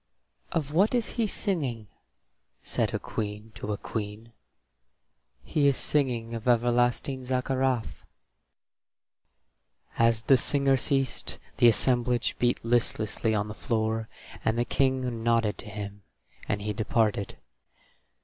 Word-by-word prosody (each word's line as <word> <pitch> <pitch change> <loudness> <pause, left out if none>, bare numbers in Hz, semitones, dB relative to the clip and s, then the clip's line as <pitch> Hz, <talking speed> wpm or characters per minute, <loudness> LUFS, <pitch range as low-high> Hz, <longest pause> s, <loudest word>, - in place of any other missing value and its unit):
"Of 150 -3 -2
what 200 +9 +3
is 235 -3 0
he 230 -2 0
singing?" 140 - -2 0.8
said - - 0
a - - -1
queen 105 +1 -5
to 105 - -5
a 105 - -1
queen. 110 +2 -6 1.1
"He 145 -2 +2
is 140 - +3
singing 120 -6 0
of 115 +1 -5
everlasting 120 +2 +2
Zaccarath." 130 -1 -1 2.0
As 115 -1 +3
the 135 +2 +5
singer 140 +1 +3
ceased 135 -1 0 0.2
the 120 - +6
assemblage 120 +1 +3
beat 120 -1 +1
listlessly 115 -2 0
on 105 0 0
the 105 - -6
floor, 110 0 -1 0.3
and 110 +1 +1
the 120 - +1
King 130 -4 0
nodded 115 -2 +1
to 105 - -6
him, 100 0 -7 0.5
and 100 0 -1
he 105 0 -2
departed. 105 -1 0
120 Hz, 120 wpm, -28 LUFS, 110-130 Hz, 2.0 s, the